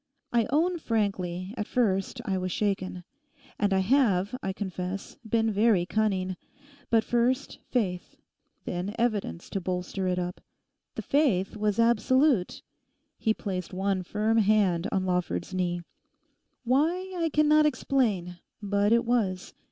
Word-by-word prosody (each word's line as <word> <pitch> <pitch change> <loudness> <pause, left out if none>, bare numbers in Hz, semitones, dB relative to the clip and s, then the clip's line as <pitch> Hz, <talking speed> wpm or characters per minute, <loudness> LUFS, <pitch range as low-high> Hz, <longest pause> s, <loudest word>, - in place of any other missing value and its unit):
I 235 -2 +3
own 335 +6 +1
frankly, 195 - -2
at 210 - -3
first 215 0 0
I 195 - 0
was 185 0 -3
shaken. 185 -3 -2 0.6
And 205 -1 +2
I 190 0 +3
have, 205 -3 +2
I 195 - -2
confess, 190 -1 -5
been 225 0 +2
very 205 -3 +3
cunning. 190 -3 0 0.5
But 225 -1 +4
first, 245 +4 0
faith, 185 -8 -2 0.5
then 180 +4 -3
evidence 215 - -1
to 195 - -2
bolster 185 +1 -3
it 180 0 0
up. 180 0 -4 0.5
The - - -4
faith 235 -12 +1
was 210 -1 0
absolute'—he 230 -2 0
placed 185 -3 -4
one 195 0 0
firm 215 +4 0
hand 200 -4 +3
on 190 -1 0
Lawford's 180 - -1
knee—'why, 255 - -3
I 330 -1 +1
cannot 305 0 +4
explain; 215 -11 0 0.2
but 205 0 +1
it 235 0 +4
was. 205 -6 0
205 Hz, 130 wpm, -27 LUFS, 185-235 Hz, 0.6 s, But